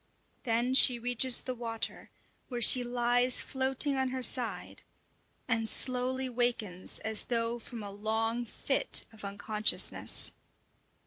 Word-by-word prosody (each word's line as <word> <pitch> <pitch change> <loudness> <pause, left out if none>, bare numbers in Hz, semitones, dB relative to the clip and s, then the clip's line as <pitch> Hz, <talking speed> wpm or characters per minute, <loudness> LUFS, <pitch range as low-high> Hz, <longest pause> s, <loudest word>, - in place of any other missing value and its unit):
Then 240 +2 0
she 255 -2 +6
reaches 245 +1 +2
the 255 - -5
water, 230 -2 -3 0.4
where 245 -2 -5
she 245 +1 +6
lies 245 +1 +1
floating 265 +1 0
on 265 0 0
her 260 0 -5
side, 230 -8 -1 0.7
and 225 -2 +1
slowly 255 +1 +1
wakens 235 -7 -1
as 220 -1 0
though 235 0 -2
from 230 -1 -10
a 200 - -8
long 220 +3 -2
fit 265 +4 -1
of 220 - -12
unconsciousness. 205 +2 -1
240 Hz, 125 wpm, -30 LUFS, 225-255 Hz, 0.7 s, she